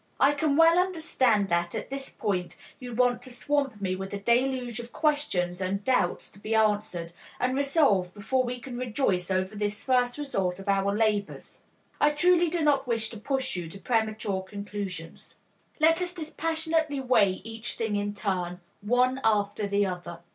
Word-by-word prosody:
I 275 - +6
can 290 0 +1
well 330 +1 +6
understand 290 - +2
that 170 0 0
at - - -5
this 275 0 -4
point 185 -4 -2 0.2
you 245 -2 -7
want 245 0 +2
to 255 - -10
swamp 270 -2 -1
me 185 -1 -1
with 195 +1 -6
a - - -4
deluge 245 +2 +1
of 240 0 -8
questions 195 - 0
and 195 +2 -2
doubts 250 -7 0
to 200 - -17
be 220 +2 -2
answered 205 -6 0 0.3
and 255 +1 +1
resolved 275 - +2
before 255 +6 0
we 250 0 -4
can 245 0 -7
rejoice 215 -7 0
over 185 +2 -1
this 205 0 -3
first 250 -1 +2
result 195 -11 -1
of 195 +1 -10
our 200 +1 +1
labors. 210 -2 -1 0.4
I 295 - +5
truly 345 +3 +3
do 335 0 -1
not 280 -3 +2
wish 225 -2 +1
to 225 - -9
push 265 +1 -1
you 175 -2 -4
to 195 - -10
premature 215 -3 -1
conclusions. 195 -3 -7 0.4
Let 325 +3 +4
us 355 0 -1
dispassionately 320 -2 -1
weigh 225 -7 +3
each 225 +1 -4
thing 220 -2 -1
in 205 0 -2
turn, 180 -3 -2 0.2
one 250 +5 +2
after 205 -1 +1
the 200 0 +2
other. 180 -2 -5
225 Hz, 175 wpm, -27 LUFS, 200-270 Hz, 0.4 s, I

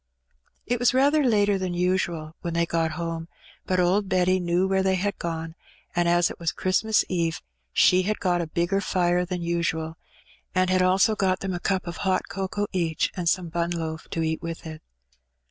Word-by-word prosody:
It 245 0 -1
was 245 +1 +3
rather 285 +3 +4
later 205 -5 +3
than 185 -2 -2
usual 175 -3 -1
when 170 -1 -3
they 170 0 +2
got 165 -1 0
home, 165 -1 -4 0.4
but 185 -1 +1
old 190 +3 +2
Betty 185 0 +3
knew 175 +1 +1
where 190 0 +2
they 190 0 +2
had 200 +2 -2
gone, 165 -1 -4 0.4
and, 175 0 +2
as 175 0 +3
it - - -10
was 170 -1 0
Christ 185 +2 0
mas 220 -1 +2
Eve, 170 -3 -1 0.3
she 185 - +5
had 210 +3 -1
got 180 -2 +1
a 170 - -3
bigger 175 +4 0
fire 180 -2 +1
in 180 - 0
than 180 -1 -3
usual, 165 -1 -1 0.6
and 185 0 +2
had 185 0 +3
also 190 +4 +4
got 190 -3 0
them 190 -1 -2
a 175 - -3
cup 190 +1 -1
of 170 -1 -6
hot 190 -2 0
cocoa 195 +1 -2
each, 165 -4 0
and 175 -3 0
some 180 -2 0
bun 170 +1 -1
loaf 160 -2 -4
to 165 - -2
eat 160 +1 -1
with 165 0 -6
it. 155 -1 -8
180 Hz, 205 wpm, -25 LUFS, 170-190 Hz, 0.6 s, she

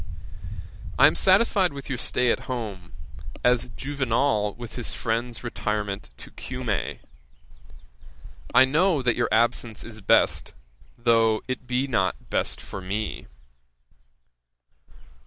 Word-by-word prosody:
'I - - +8
am - - +6
satisfied 190 - +3
with 140 -1 -8
your 130 -3 -3
stay 125 -1 +2
at - - -3
home, 105 -8 -5 0.5
as 125 0 +3
Juvenal 135 -6 0
with 120 -2 -8
his 120 - -3
friend's 115 0 -2
retirement 105 - -3
to - - -10
Cumæ: 125 -7 -3 1.5
I 130 - +7
know 155 +2 +2
that 120 -2 +2
your - - 0
absence 115 0 +1
is 110 -1 -9
best, - - +2 0.4
though 115 -2 +3
it 130 -1 -4
be 125 +2 +1
not 95 -9 -1
best - - -1
for 95 - -8
me. 100 +4 -4
120 Hz, 120 wpm, -25 LUFS, 110-130 Hz, 1.5 s, I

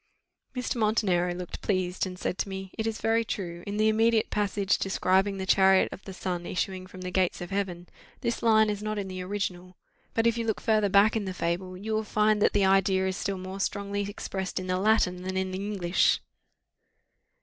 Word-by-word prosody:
Mr. 250 0 -2
Montenero 205 -5 +2
looked 180 -1 -7
pleased, 185 -2 0
and 180 -1 -7
said 180 - -3
to - - -1
me, 190 -1 -6
"It 220 - -2
is 225 -1 -3
very 225 +1 +2
true, 175 -5 -5
in 205 +1 -3
the 215 0 +3
immediate 225 +1 +3
passage 200 -1 +1
describing 195 +1 +1
the 190 - -3
chariot 190 0 +5
of 190 - -10
the 195 - -7
Sun 180 -2 -4
issuing 185 0 -3
from 185 0 -11
the 180 0 -4
gates 185 -1 +1
of 175 +1 -7
Heaven, 185 -3 -3 0.3
this 235 -2 -1
line 220 -2 +4
is 205 -1 -4
not 215 0 -3
in 195 -2 -3
the 185 0 -5
original; 185 -2 -4 0.4
but 225 - +2
if 230 0 +2
you 230 - -2
look 220 - 0
further 215 -3 +2
back 200 +3 +5
in 215 -2 -1
the 185 -1 -4
fable, 180 +2 -2
you 215 +3 -4
will 215 0 +1
find 215 0 +2
that - - +4
the 200 -1 +3
idea 190 0 +3
is 190 - -2
still 195 0 -2
more 185 +1 -7
strongly 200 +1 -2
expressed 195 -1 -4
in 185 - -5
the 185 0 0
Latin 190 -3 +2
than 190 +1 -3
in 190 0 -1
the 185 - -4
English." 190 -4 +2
195 Hz, 215 wpm, -28 LUFS, 185-215 Hz, 0.4 s, chariot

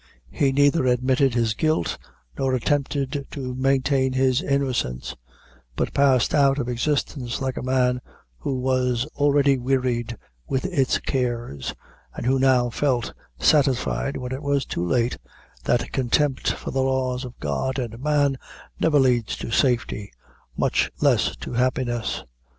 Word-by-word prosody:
He 140 -2 +1
neither 145 0 +3
admitted 130 +1 +2
his 115 -2 +1
guilt, 155 - 0 0.4
nor 130 -1 0
attempted 140 +1 -1
to 130 -3 -5
maintain 130 0 +1
his 130 +1 +2
innocence, 130 - -1 0.6
but - - -2
passed 135 -3 +3
out 140 -1 +4
of 130 -4 -2
existence 125 0 -1
like 130 -1 -2
a - - -4
man 125 -1 +1 0.4
who 135 - -2
was 125 -1 0
already 140 -2 +3
wearied 125 -2 -1 0.3
with 130 - -1
its 140 -8 +1
cares, 120 - -3 0.4
and - - -5
who 130 +1 +2
now 130 -2 +3
felt 125 -3 0 0.3
satisfied, 140 - +2
when 125 -1 -5
it 130 +2 -4
was 140 -1 0
too 85 - -3
late, 115 +7 0 0.5
that - - +1
contempt 135 +2 +1
for - - -6
the 135 - 0
laws 130 -1 0
of 125 -1 -9
God 75 - -2
and 115 -3 -4
man, 145 -2 +1 0.4
never 155 -2 +3
leads 125 -4 +2
to - - -6
safety, 120 -5 0 0.5
much - - +1
loss - - +2
to - - -7
happiness. 120 -1 -1
130 Hz, 140 wpm, -23 LUFS, 125-140 Hz, 0.6 s, out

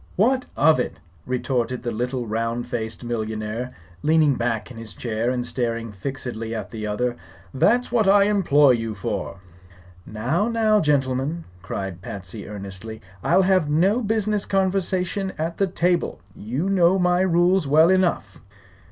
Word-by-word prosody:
"What 255 +6 +2
of 155 0 +5
it?" 125 - -3 0.3
retorted 125 -1 -1
the 120 - -2
little 125 +2 -2
round 115 +2 -2
faced 115 -1 -5
millionaire, 110 +1 -4 0.3
leaning 155 -2 +4
back 115 -2 -2
in 120 - -10
his 110 -5 -9
chair 115 0 -2
and 125 -1 -1
staring 115 -3 -2
fixedly 115 +1 -5
at 110 - -5
the 110 -2 -5
other. 120 +4 -1 0.4
"That's 240 - +2
what 220 -4 +2
I 200 +1 +6
employ 170 -9 +4
you 115 -3 -1
for." 95 -1 -4 0.7
"Now, 130 - -1
now, 220 -2 +3
gentlemen!" 145 +1 0 0.2
cried 95 -1 -5
Patsy, 100 +2 -7
earnestly. 100 +2 -8 0.2
"I'll 190 - +4
have 185 -5 +2
no 190 +10 +3
business 215 -2 0
conversation 190 0 0
at 165 +2 -3
the 195 - +3
table. 175 0 0 0.2
You 130 - -3
know 190 -1 +4
my 180 -1 +2
rules 180 -1 +3
well 160 +5 +5
enough." 185 -2 0
135 Hz, 145 wpm, -23 LUFS, 115-185 Hz, 0.7 s, I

